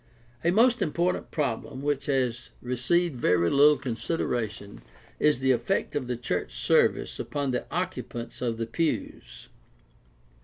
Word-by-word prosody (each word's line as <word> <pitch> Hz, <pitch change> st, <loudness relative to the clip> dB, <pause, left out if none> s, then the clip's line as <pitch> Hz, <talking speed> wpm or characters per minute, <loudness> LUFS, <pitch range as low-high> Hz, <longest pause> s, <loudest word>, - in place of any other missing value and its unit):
— 120 Hz, +1 st, -30 dB
A 170 Hz, -, +3 dB
most 230 Hz, +6 st, +4 dB
important 175 Hz, +3 st, 0 dB
problem 135 Hz, -2 st, -3 dB
which 145 Hz, -1 st, -1 dB
has 130 Hz, -4 st, 0 dB
received 130 Hz, +7 st, 0 dB
very 90 Hz, -6 st, +2 dB
little 145 Hz, +1 st, +6 dB
consideration 115 Hz, -5 st, -3 dB, 0.4 s
is 150 Hz, -4 st, +3 dB
the 130 Hz, 0 st, +3 dB
effect 160 Hz, +10 st, 0 dB
of 135 Hz, -4 st, -2 dB
the 125 Hz, -1 st, -2 dB
church 120 Hz, -, -3 dB
service -, -, +2 dB
upon 145 Hz, -2 st, -2 dB
the 125 Hz, -, -2 dB
occupants 120 Hz, 0 st, -4 dB
of 115 Hz, -2 st, -1 dB
the 115 Hz, -, -2 dB
pews. 160 Hz, +8 st, -3 dB
130 Hz, 140 wpm, -27 LUFS, 120-150 Hz, 0.4 s, little